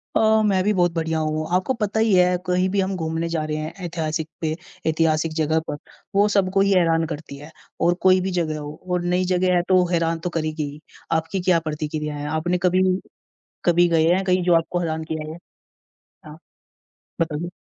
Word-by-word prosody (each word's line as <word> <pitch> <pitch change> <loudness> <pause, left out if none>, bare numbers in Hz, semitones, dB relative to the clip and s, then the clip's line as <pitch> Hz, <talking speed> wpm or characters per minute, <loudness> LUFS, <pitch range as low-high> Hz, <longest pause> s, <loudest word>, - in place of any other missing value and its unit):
अ, 220 0 +4
मैं 190 -3 +2
भी 210 +2 +2
बहुत 175 -3 +2
बढ़िया 160 -1 -1
हूँ। 155 0 -1
आपको 185 +8 +1
पता 210 +1 0
ही 220 -2 +3
है 180 0 +4
कहीं 180 +1 +2
भी 200 +1 0
हम 190 0 -2
घूमने 160 0 -2
जा 165 -2 -1
रहे 155 0 -3
हैं 155 +1 -5
ऐतिहासिक 160 -2 -3
पे 155 -1 -1 0.3
ऐतिहासिक 160 0 +1
जगह 160 0 +1
पर, 145 - -3 0.4
वो 205 +1 +5
सबको 195 0 +2
ही 200 0 +3
हैरान 165 -3 +3
करती 145 -3 -7
है। 150 +3 -12 0.3
और 170 +1 +4
कोई 185 0 +5
भी 190 +1 -2
जगह 155 -2 -2
हो 150 0 -7 0.2
और 180 -1 +1
नई 180 +1 +1
जगह 180 0 +2
है 175 - +3
तो 185 - +5
वो 180 - +4
हैरान 165 -1 +1
तो 180 - -3
करेगी 155 -2 -2
ही, 150 +1 -13 0.3
आपकी 165 +4 -1
क्या 175 -2 +3
प्रतिक्रिया 150 -1 -4
है? 145 0 -5
आपने 160 +4 0
कभी 185 0 +3 0.8
कभी 175 0 +4
गए 165 -1 +3
हैं 190 +2 +1
कहीं 185 -1 +2
जो 175 - +3
आपको 165 +2 0
हैरान 160 -2 -2
किया 155 -1 -4
हो? 160 - -7 0.9
हाँ, 155 +1 -11 0.8
बताइए। 165 +1 -2
165 Hz, 205 wpm, -22 LUFS, 155-185 Hz, 0.9 s, वो